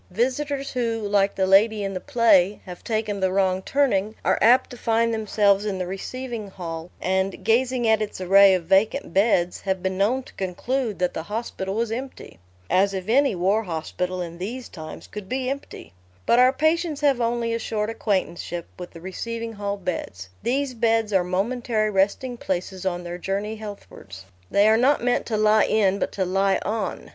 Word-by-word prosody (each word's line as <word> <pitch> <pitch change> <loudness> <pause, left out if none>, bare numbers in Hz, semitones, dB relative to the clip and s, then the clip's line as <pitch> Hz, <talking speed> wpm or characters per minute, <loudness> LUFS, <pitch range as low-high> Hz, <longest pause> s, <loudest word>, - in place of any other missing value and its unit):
Visitors 270 +7 -1
who, 230 -3 -1
like 200 -1 +1
the 190 - +1
lady 205 +2 +4
in 195 0 -3
the 185 - -3
play, 210 -7 +3
have 180 -2 -10
taken 215 -3 -2
the 190 -1 +1
wrong 190 -1 +1
turning, 215 -4 +1
are - - +2
apt 240 +4 +5
to - - -7
find 230 0 +1
themselves 205 -2 +2
in 205 -3 -2
the 185 - -2
receiving 230 +4 -5
hall, 170 -3 -7
and, 190 +1 -1
gazing 245 +1 +2
at 220 0 +3
its 210 -3 -4
array 195 +1 +6
of 180 - -2
vacant 195 +3 +2
beds, 190 -3 +2
have 190 -1 -2
been 190 0 -2
known 245 +7 +2
to - - -16
conclude 215 +5 -2
that 180 -1 0
the - - -3
hospital 205 0 -4
was 230 0 -1
empty. 255 - -7 0.3
(As 195 - +2
if 185 0 -5
any 270 0 +3
war 195 +5 +2
hospital, 180 0 -3
in 170 0 -9
these 235 +7 -5
times, 155 -2 -9
could 210 -2 -9
be 255 0 -1
empty!) 275 - -8 0.3
But 240 - +4
our 255 +1 +6
patients 315 +2 0
have 275 -4 +2
only 235 0 0
a 230 - -1
short 215 -1 -2
acquaintanceship 185 -5 -2
with 180 - -7
the 165 - -13
receiving 230 +5 -5
hall 200 -1 -3
beds: 95 - -5
these 265 +3 -1
beds 225 -2 +1
are 190 -2 +4
momentary 215 +4 -1
resting 205 +6 0
places 190 -1 -3
on 175 -1 -2
their 175 0 -6
journey 200 +4 -3
healthwards: 200 - -10 0.3
they 200 +1 +4
are 220 0 +5
not 260 +2 +3
meant 245 0 +1
to 220 - -1
lie 215 0 +4
in 200 -2 +2
but - - -1
to 190 - -1
lie 195 +1 +1
on. 220 +1 -3
210 Hz, 190 wpm, -24 LUFS, 190-235 Hz, 0.3 s, array